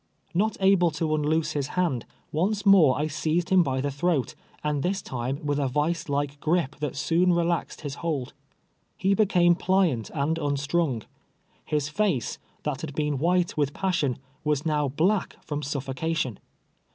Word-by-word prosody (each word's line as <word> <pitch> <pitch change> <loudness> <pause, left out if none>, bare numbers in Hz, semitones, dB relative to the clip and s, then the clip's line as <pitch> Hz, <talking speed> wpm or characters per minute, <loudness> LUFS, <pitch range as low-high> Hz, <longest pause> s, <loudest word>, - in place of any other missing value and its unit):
Xot 210 +5 +1
aide 190 -4 +4
to 155 -2 0
unloose 155 +1 +1
his 145 -3 -2
hand, 160 -10 0 0.2
once 200 +6 0
more 180 -10 +6
I 150 - 0
seized 160 +3 -1
him 185 -2 +6
1)V 130 -3 -1
the 145 - -1
throat, 145 -1 0 0.3
and 150 -2 0
this 190 +5 0
time, 130 0 -4
with 145 0 0
a 140 - +1
vicedike 145 0 -1
gripe 160 -3 0
that 145 -2 -3
soon 170 +5 +2
relaxed 170 0 -1
his 145 -3 -4
hold, 150 -7 -2 0.7
lie 195 +1 +4
became 185 -4 +4
pliant 175 - +1
and 155 +2 -1
unstrung. 145 -3 0 0.6
His 150 -2 0
face, 175 - 0 0.2
that 150 -3 -2
had 155 -3 -5
heen 150 -3 0
white 175 +2 +2
with 145 -1 0
passion, 170 -9 0 0.3
was 150 -1 0
now 150 -2 +1
black 175 +9 +1
from 145 -1 -3
suffocation. 140 -2 -2
155 Hz, 155 wpm, -26 LUFS, 140-175 Hz, 0.7 s, more